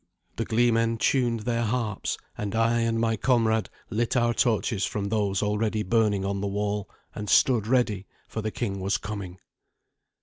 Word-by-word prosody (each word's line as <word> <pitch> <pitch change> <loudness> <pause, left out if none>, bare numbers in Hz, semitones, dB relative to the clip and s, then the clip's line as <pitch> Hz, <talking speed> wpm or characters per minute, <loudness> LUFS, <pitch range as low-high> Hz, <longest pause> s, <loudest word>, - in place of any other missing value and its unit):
The - - -1
gleemen 115 0 +2
tuned 120 -2 +1
their 115 +1 -1
harps, 115 -2 -1 0.2
and 105 0 -4
I 115 +1 +3
and 115 -1 +1
my 115 -1 +1
comrade 110 -2 +2 0.2
lit 120 +3 0
our 120 -1 +3
torches 110 -3 +1
from 100 -1 -2
those 100 -2 0
already 105 +1 0
burning 105 -1 +2
on 100 0 -2
the 100 - -1
wall, 105 +1 -2 0.2
and 105 -1 -5
stood 115 0 +4
ready, 115 -6 +1 0.2
for 110 - -4
the 110 - -2
king 100 -3 -3
was 95 +2 0
coming. 100 -3 -6
110 Hz, 165 wpm, -26 LUFS, 100-115 Hz, 0.2 s, stood